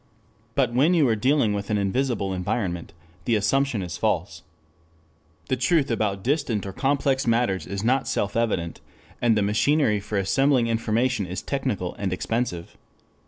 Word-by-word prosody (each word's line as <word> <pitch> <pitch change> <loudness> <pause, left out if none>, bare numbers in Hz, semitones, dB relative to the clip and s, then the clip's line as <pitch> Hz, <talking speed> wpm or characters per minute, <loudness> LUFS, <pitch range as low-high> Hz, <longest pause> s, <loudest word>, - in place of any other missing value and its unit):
But 125 -4 +1
when 150 +9 +4
you 155 -5 +4
are 110 - +3
dealing 125 -1 +2
with 100 0 -4
an 105 - +1
invisible 100 -1 0
environment, 90 -1 -2 0.3
the 115 - +2
assumption 115 +1 +1
is 85 -3 -5
false. - - -1 1.1
The 130 - +1
truth 135 +2 +1
about 100 -4 -1
distant 125 -7 0
or 95 - -6
complex 135 0 0
matters 115 -5 +1
is 100 0 -4
not 130 +3 +1
self 100 0 -1
evident, 100 -8 -1 0.4
and 115 -2 +3
the 105 - +2
machinery 110 +2 +2
for 100 +1 -4
assembling 130 +6 +2
information 115 -1 0
is 90 +1 -5
technical 130 -10 -2
and 100 -2 -1
expensive. 90 -2 -3
115 Hz, 155 wpm, -24 LUFS, 100-130 Hz, 1.1 s, when